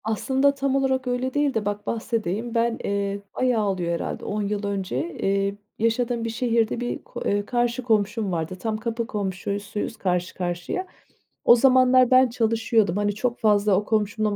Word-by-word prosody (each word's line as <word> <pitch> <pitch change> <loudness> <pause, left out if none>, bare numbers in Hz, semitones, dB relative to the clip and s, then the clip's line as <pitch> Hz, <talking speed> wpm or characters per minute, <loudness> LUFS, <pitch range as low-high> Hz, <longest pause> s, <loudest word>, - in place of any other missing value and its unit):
Aslında 265 +6 +1
tam 275 -1 0
olarak 265 -1 +1
öyle 250 +1 -1
değil 290 -1 +1
de 220 -2 -1
bak 205 0 -3
bahsedeyim. 225 0 -2
Ben, 230 0 +1
eee, 200 0 -2
bayağı 245 -4 +1
oluyor 180 -3 -1
herhâlde 170 - -4
10 210 +1 -2
yıl 205 0 -2
önce, 200 -1 -2 0.2
eee, 195 0 0 0.2
yaşadığım 230 +1 0
bir - - -1
şehirde 230 0 0
bir 245 0 -4
ko - - -9
eee, 205 0 0
karşı 240 +1 0
komşum 215 -2 +1
vardı. 165 +1 -2
Tam 220 +2 -2
kapı 230 +1 -3
komşusuyuz 200 +2 -3
karşı 180 -1 -1
karşıya. 180 - -3 0.6
O 240 - +8
zamanlar 255 0 +5
ben 255 0 +6
çalışıyordum. 225 -4 +1
Hani, 205 0 0
çok 240 +3 -2
fazla 210 -2 +3
o 205 +2 0
komşumla 215 -1 0
220 Hz, 165 wpm, -24 LUFS, 200-245 Hz, 0.6 s, O